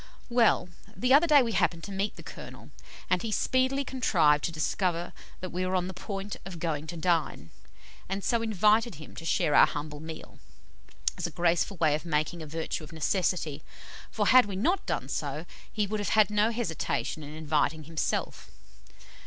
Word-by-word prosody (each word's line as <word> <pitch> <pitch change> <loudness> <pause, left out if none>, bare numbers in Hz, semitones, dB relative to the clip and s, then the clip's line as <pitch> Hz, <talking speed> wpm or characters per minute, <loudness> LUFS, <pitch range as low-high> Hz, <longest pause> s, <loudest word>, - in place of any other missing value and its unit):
Well, 235 -6 +3 0.3
the 250 +1 +2
other 305 +5 +6
day 290 -4 +7
we 230 - -2
happened 170 -5 +1
to 200 - -7
meet 195 +2 -2
the - - -11
Colonel, - - -10 0.4
and 185 -1 +1
he 225 - -3
speedily 260 +5 +1
contrived 165 - +3
to - - -2
discover 170 +2 -1 0.3
that 185 - -5
we 180 +2 -2
were 185 +1 -1
on 180 -1 +1
the 190 - -6
point 195 +2 -5
of 190 -3 -8
going 160 -2 -3
to 170 - -6
dine, 160 - 0 0.6
and 195 +1 -3
so 235 -2 +1
invited 215 0 +3
him 155 +1 -12
to 165 - -8
share 150 - +1
our - - +8
humble 150 0 -5
meal, 160 +1 -9 0.8
as - - -1
a - - -6
graceful 170 +4 +1
way 155 -3 +3
of 150 - -2
making 160 +1 -1
a 155 - -7
virtue 160 +1 -4
of 155 - -10
necessity, 160 -2 -1 0.5
for - - -1
had 255 -4 +7
we 200 - -5
not 340 - 0
done - - -2
so, - - -3 0.3
he 210 -1 0
would 215 +1 -3
have 205 - -2
had 215 -1 +4
no 210 +1 +3
hesitation 220 -8 -2
in 150 +1 -8
inviting 155 0 0
himself. 160 +1 -3
180 Hz, 185 wpm, -28 LUFS, 160-215 Hz, 0.8 s, our